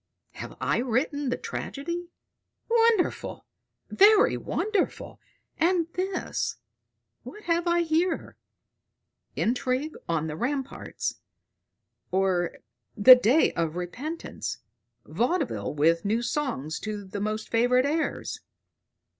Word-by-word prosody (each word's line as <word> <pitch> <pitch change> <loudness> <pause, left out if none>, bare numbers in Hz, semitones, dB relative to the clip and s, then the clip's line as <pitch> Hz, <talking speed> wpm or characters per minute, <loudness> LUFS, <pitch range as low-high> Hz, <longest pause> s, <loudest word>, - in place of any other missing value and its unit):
Have - - -9
I - - +1
written 265 +4 0
the - - -1
tragedy? 340 +5 -5 0.6
Wonderful, 460 -4 +1 0.4
very 410 +1 +5
wonderful! 415 -3 -2 0.4
And 335 0 +2
this 370 0 -2 0.7
what 420 - -11
have 340 0 0
I 345 0 +3
here? 330 +2 0 1.0
'INTRIGUE 255 +5 -1
ON 160 -2 0
THE 155 -1 -4
RAMPARTS; 270 - -3 0.9
or 185 -2 0 0.4
THE 250 +5 +11
DAY 250 +5 +3
OF 165 -1 -1
REPENTANCE: 260 - -5 0.5
vaudeville 245 - -1
with 165 +3 +3
new 220 +4 0
songs 240 - -2
to 210 -2 -5
the 200 +1 -6
most 215 +1 -3
favorite 245 +3 +3
airs.' 310 +3 -2
260 Hz, 100 wpm, -27 LUFS, 205-340 Hz, 1.0 s, THE